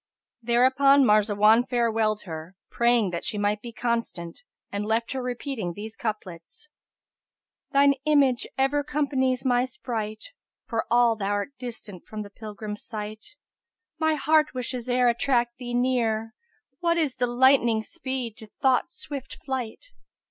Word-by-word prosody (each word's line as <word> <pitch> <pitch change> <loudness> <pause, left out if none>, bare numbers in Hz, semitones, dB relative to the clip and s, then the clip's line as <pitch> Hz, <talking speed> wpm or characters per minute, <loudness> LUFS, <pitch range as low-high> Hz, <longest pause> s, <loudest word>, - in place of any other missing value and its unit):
Thereupon 260 +4 +4
Marzawan 210 +1 +5
farewelled 225 -3 +1
her, 165 +1 -8 0.2
praying 235 -5 +2
that 170 - -4
she 210 - -1
might 205 +1 0
be 235 - -8
constant 230 - -3 0.3
and 200 +1 -2
left 225 +2 0
her 265 - -2
repeating 245 -6 -4
these 220 +2 -7
couplets, 205 - -6 1.0
"Thine 280 0 +5
image 280 -5 +3
ever 270 +2 +2
companies 265 -3 0
my 245 -1 +3
sprite, 230 - -5 0.2
* - - -67
For 230 -2 -2
all 240 0 +4
thou'rt 205 +5 -2
distant 225 -7 -7
from 215 -1 -5
the 205 - -12
pilgrim's 210 0 -7
sight: 215 - -7 0.6
But - - -3
my 315 - +3
heart 305 0 +2
wishes 250 0 -3
e'er 250 0 +3
attract 240 0 +1
thee 245 -1 -4
near: 230 -3 0 0.2
* - - -47
What 340 -1 +1
is 300 -6 0
the 245 - +1
lightning's 240 -3 +3
speed 260 -8 -4
to 220 - -12
Thought's 265 +7 +2
swift 280 -6 -6
flight? 260 - -4
240 Hz, 145 wpm, -26 LUFS, 215-265 Hz, 1.0 s, Marzawan